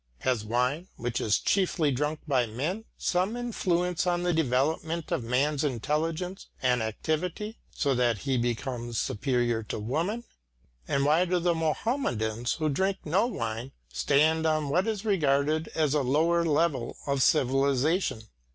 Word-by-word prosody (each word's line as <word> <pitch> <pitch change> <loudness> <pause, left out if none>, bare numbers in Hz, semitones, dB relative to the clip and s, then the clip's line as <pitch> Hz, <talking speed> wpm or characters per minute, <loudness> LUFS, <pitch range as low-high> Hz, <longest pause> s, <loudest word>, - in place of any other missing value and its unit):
Has 125 -5 0
wine, 125 - 0
which 120 -1 -3
is 105 - +3
chiefly 175 -6 +1
drunk 150 +4 -1
by 130 -5 +2
men, 155 - -3
some 185 +6 0
influence 180 -7 0
on 175 0 +1
the 175 0 +1
development 160 +3 0
of - - 0
man's 135 +5 +1
intelligence 155 - -2
and 125 -2 +2
activity, 165 - -3
so 140 -3 0
that 120 -3 +2
he 135 +5 -1
becomes 120 0 -2
superior 120 0 0
to 105 - -5
woman? 165 - -2 0.6
And 140 0 +1
why 155 +5 +4
do 180 0 +1
the 175 0 +2
Muhammadans 140 - -1
who 155 -2 -1
drink 190 +7 +1
no 185 +9 +2
wine 115 - -4 0.2
stand 160 +3 +3
on 155 -2 +1
what 180 +8 +2
is 220 -1 -2
regarded 155 -4 +2
as 155 -3 +2
a 150 - +2
lower 160 +6 +2
level 150 -6 0
of 140 -1 0
civilisation? 135 - +2
150 Hz, 145 wpm, -28 LUFS, 125-170 Hz, 0.6 s, why